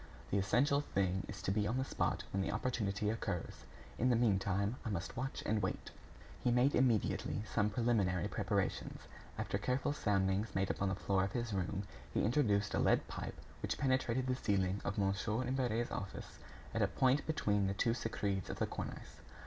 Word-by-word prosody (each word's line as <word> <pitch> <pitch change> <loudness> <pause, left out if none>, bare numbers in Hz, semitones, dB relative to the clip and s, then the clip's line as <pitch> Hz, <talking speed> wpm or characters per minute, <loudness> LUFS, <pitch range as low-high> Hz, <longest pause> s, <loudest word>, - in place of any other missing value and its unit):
"The 100 - +3
essential 135 +9 +3
thing 95 -7 -1
is 105 - -7
to - - +1
be 105 +1 +1
on 115 +4 0
the 130 - 0
spot - - -1
when 95 - +1
the 95 - -1
opportunity 105 -3 0
occurs. 90 -6 -4 0.3
In 125 - +3
the 120 - +4
meantime, 100 -1 +2
I 115 - -3
must 95 -3 -3
watch 130 +2 -3
and 110 0 +1
wait." 95 - -3 0.5
He - - +3
made 125 +4 +4
immediately 120 -4 +2
some 105 -1 +1
preliminary 105 -6 +1
preparations. - - -1 0.4
After - - -1
careful 135 +3 0
soundings 100 -3 +1
made 95 0 +2
upon 95 - 0
the 95 - 0
floor 95 -1 +1
of 95 - -2
his 120 -3 -2
room, 95 +1 -1 0.3
he - - +1
introduced 105 -4 +2
a - - +1
lead - - +3
pipe - - -5 0.3
which - - -1
penetrated 130 -2 +1
the 130 - +1
ceiling 100 -5 0
of 100 - -2
Mon. 100 -1 +2 0.3
Imbert's 120 -3 0
office 100 - -6 0.3
at - - 0
a - - +4
point 130 +2 +2
between 105 -10 +1
the 95 - -1
two 115 +3 +2
screeds 100 -5 -2
of - - -4
the - - +1
cornice. - - -7
105 Hz, 185 wpm, -36 LUFS, 95-125 Hz, 0.5 s, the